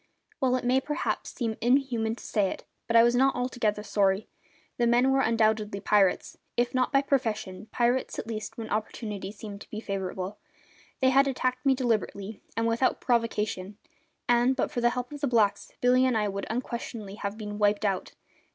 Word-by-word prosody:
Well, 255 -1 +2
it 255 - -2
may 255 +2 +3
perhaps 295 +2 -2
seem 225 -3 -3
inhuman 240 -3 +2
to - - -13
say 205 -4 +1
it, - - -6 0.2
but 230 - 0
I 230 - +8
was 240 0 +4
not 265 +2 +3
altogether 240 -4 -1
sorry. 200 0 +1 0.5
The 240 - +2
men 245 +3 +4
were 270 0 +3
undoubtedly 220 -3 +1
pirates, 195 -2 +2 0.2
if 240 0 +1
not 255 -1 +1
by 275 -1 +3
profession, 220 -8 -1
pirates 245 +2 +1
at - - -4
least 220 -1 -5
when 225 -1 -6
opportunity 210 -2 -3
seemed 205 -1 -9
to - - -12
be 215 - -5
favourable. 195 -1 -4 0.6
They 260 0 +5
had 275 +1 +5
attacked 255 -1 -1
me 270 - +5
deliberately 220 -4 -2 0.2
and 230 - +1
without 230 +3 +1
provocation, 210 -5 -1 0.5
and, 245 +2 +4
but 260 - -1
for 240 - -2
the 240 - +4
help 250 +1 -4
of 290 -1 -8
the 285 - +1
blacks, 220 -5 +2
Billy 250 +1 +4
and 250 -3 +2
I 210 -1 +1
would 200 0 -4
unquestionably 235 -3 -4
have 200 0 -4
been 210 -1 -6
"wiped 205 0 +2
out". 195 -2 -1
230 Hz, 190 wpm, -28 LUFS, 210-250 Hz, 0.6 s, I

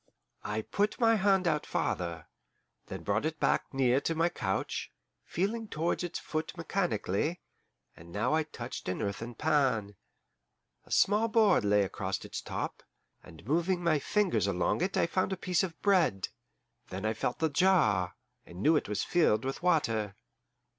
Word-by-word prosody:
I 105 +1 -2
put 205 - -1
my 225 -2 +5
hand 195 -3 +3
out 150 -2 +1
farther, 85 -2 -2 0.6
then - - -7
brought 105 +4 0
it 155 0 -2
back - - +1
near 135 0 +2
to 165 - -1
my 165 +2 +2
couch, 95 - -3 0.3
feeling 215 +5 -2
towards 170 0 -1
its 175 0 -3
foot 155 +3 -4
mechanically, 160 - -1 0.6
and 85 +1 -14
now 105 - 0
I 160 - +3
touched 130 -9 -6
an 90 - -2
earthen 115 +4 -4
pan. 130 -9 +1 0.9
A - - -16
small 210 +3 +4
board 215 - +4
lay 105 0 +4
across 95 - -3
its - - -5
top, - - -4 0.4
and 80 - -14
moving 170 - +1
my 160 -3 +3
fingers 145 - +1
along 90 - 0
it 190 +2 0
I - - +4
found 185 +3 0
a - - -4
piece 180 -1 +1
of 175 -4 -4
bread. 180 - +3 0.6
Then 95 +3 -5
I 110 - +1
felt 120 +2 -2
the 160 - +1
jar, 145 - +3 0.3
and 85 +2 -12
knew 160 - +5
it 150 - 0
was 105 -1 -1
filled 130 -10 +2
with 135 - -3
water. 115 - +1
155 Hz, 165 wpm, -30 LUFS, -, 0.9 s, my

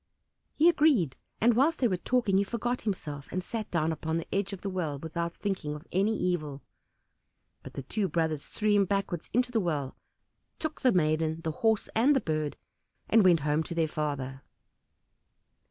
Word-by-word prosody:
He 315 - +5
agreed, 290 - +4 0.2
and 235 +1 +4
whilst 295 +6 +3
they 250 - +3
were 190 - +1
talking 200 0 +1
he - - +3
forgot 240 +4 -2
himself, 150 -9 -4
and 185 0 -2
sat 220 +2 -5
down 165 -2 +1
upon 160 +1 -2
the 165 - -3
edge 200 0 0
of 195 - -7
the 200 - -3
well 165 -6 -2
without 170 +3 -3
thinking 170 -6 -3
of 150 +3 -10
any 200 +4 +2
evil. 155 -6 -2 1.0
But - - -11
the 135 - -5
two 200 - -1
brothers 160 -2 -1
threw 215 -1 0
him 205 -1 +4
backwards 195 -3 -2
into 245 +2 +1
the 230 - +2
well, 150 -8 -2 0.6
took 315 -1 -4
the 255 - +5
maiden, 160 -2 +1
the 160 - -1
Horse, 220 +6 +1
and 260 +6 +4
the - - +4
Bird, 155 - -2 0.5
and 225 -1 +6
went 175 -4 +5
home 150 +2 +1
to 170 +1 -5
their 165 -1 +2
father. 140 -4 -3
180 Hz, 185 wpm, -29 LUFS, 155-220 Hz, 1.0 s, and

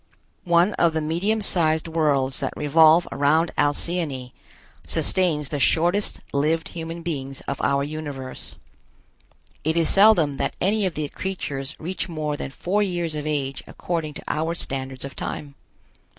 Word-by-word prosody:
One 175 +4 +4
of 170 -2 +4
the 160 - 0
medium 190 +8 0
sized 160 -4 +1
worlds 145 -5 +1
that - - -3
revolve 160 +3 +5
around 155 +4 +2
Alcyone 145 -3 -1 0.5
sustains 155 -7 +1
the 145 - -2
shortest 175 +8 +2
lived 160 +3 +1
human 165 0 -6
beings 135 -5 -4
of 140 - -4
our 140 0 +2
universe. 145 -3 -6 1.1
It 160 +2 +1
is 165 -2 +3
seldom 195 -9 +5
that - - -1
any 205 +1 +2
of 180 - -5
the 150 -1 -2
creatures 150 -7 -4
reach 180 +3 -4
more 155 -3 -2
than 145 - -5
four 190 +9 -1
years 175 -5 -1
of 150 0 -4
age 140 -3 -2
according 160 -4 -3
to - - -7
our 160 +2 -1
standards 135 -4 -4
of 140 - -8
time. 145 -1 -5
155 Hz, 150 wpm, -24 LUFS, 145-170 Hz, 1.1 s, revolve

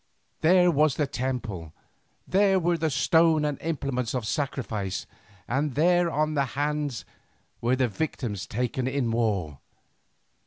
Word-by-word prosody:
There 180 +2 +5
was 150 -2 +3
the 150 - +1
temple, 120 - -4 0.5
there 195 0 +3
were 175 0 +1
the 160 -1 0
stone 160 +1 +3
and 145 -2 -2
implements 135 -7 -2
of 125 -4 -2
sacrifice, 110 -6 -3 0.4
and 135 +3 -1
there 175 +3 +3
to 155 0 0
their 140 -2 +2
hands 145 -3 -2 0.6
were 120 +2 +2
the 130 -1 +2
victims 115 - -3
taken 125 +1 -2
in 130 -3 0
war. 100 - -1
135 Hz, 130 wpm, -26 LUFS, 115-155 Hz, 0.6 s, There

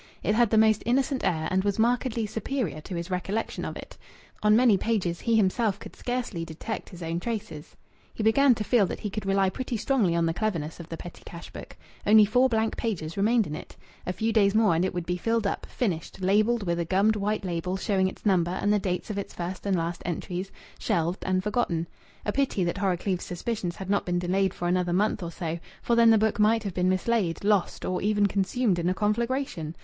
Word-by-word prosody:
It 210 - +2
had 235 0 +3
the 220 - +2
most 220 -1 +4
innocent 260 +2 +1
air, 160 -2 0
and 190 0 +2
was 200 -1 0
markedly 235 0 +1
superior 220 - -3
to 180 +3 -7
his 170 +2 -5
recollection 195 +5 -2
of - - -5
it. - - -11 0.4
On 210 0 +5
many 235 -2 +5
pages 190 -5 -1
he 230 -1 +1
himself 210 0 +2
could - - -11
scarcely 245 -8 -3
detect 165 +7 -6
his 180 -3 -9
own 165 +1 -2
traces. 195 -8 -5 0.4
He 220 - -4
began 250 +4 +5
to 215 - -3
feel 210 -3 +3
that - - -6
he 210 - -3
could 210 -1 -4
rely 195 -1 +2
pretty 245 +2 -3
strongly 210 -7 +1
on 170 0 +2
the 165 - 0
cleverness 170 -7 -2
of 170 0 -9
the 165 - -5
petty 175 - -10
cash 170 0 -10
book. - - -10 0.3
Only 215 0 +7
four 250 +5 +3
blank 225 -1 0
pages 165 -8 -3
remained 220 +3 +3
in 150 - -5
it. - - -10 0.3
A - - +1
few 220 +4 -1
days 200 -2 +3
more 220 -5 +4
and 165 +2 +1
it 190 - 0
would 175 -2 -4
be 180 +1 -1
filled 225 +2 0
up, 200 - -2
finished, 190 -8 -3
labelled 210 +4 +2
with 170 -2 -1
a 170 - -1
gummed 200 +5 +3
white 210 0 -1
label 180 +1 -2
showing 190 -1 +1
its 190 - -8
number 180 -2 +2
and 205 - +2
the 210 - +3
dates 185 +2 -2
of 200 - -3
its 200 - -7
first 180 +3 -5
and 195 - +2
last 170 +1 -3
entries, 180 +2 -4 0.3
shelved 170 +2 -1
and 185 0 +1
forgotten. 210 -6 0 0.4
A 210 - +1
pity 270 -7 0
that 175 +3 -2
Horrocleave's 185 -1 0
suspicions 180 -1 -3
had 190 - -7
not 200 - +1
been 175 0 0
delayed 185 +2 0
for 175 - -3
another 180 0 +1
month 205 +2 +1
or 170 - -4
so, 170 -1 -4 0.2
for 235 - +2
then 230 -1 +6
the 225 - +6
book 215 0 +1
might 220 +1 +3
have 200 -3 -4
been 180 +1 +1
mislaid, 185 -2 0
lost, 205 -3 +1
or 185 0 -1
even 205 0 +2
consumed 200 0 +1
in 170 +1 0
a 185 - 0
conflagration! 210 - -1
200 Hz, 225 wpm, -27 LUFS, 175-220 Hz, 0.4 s, Only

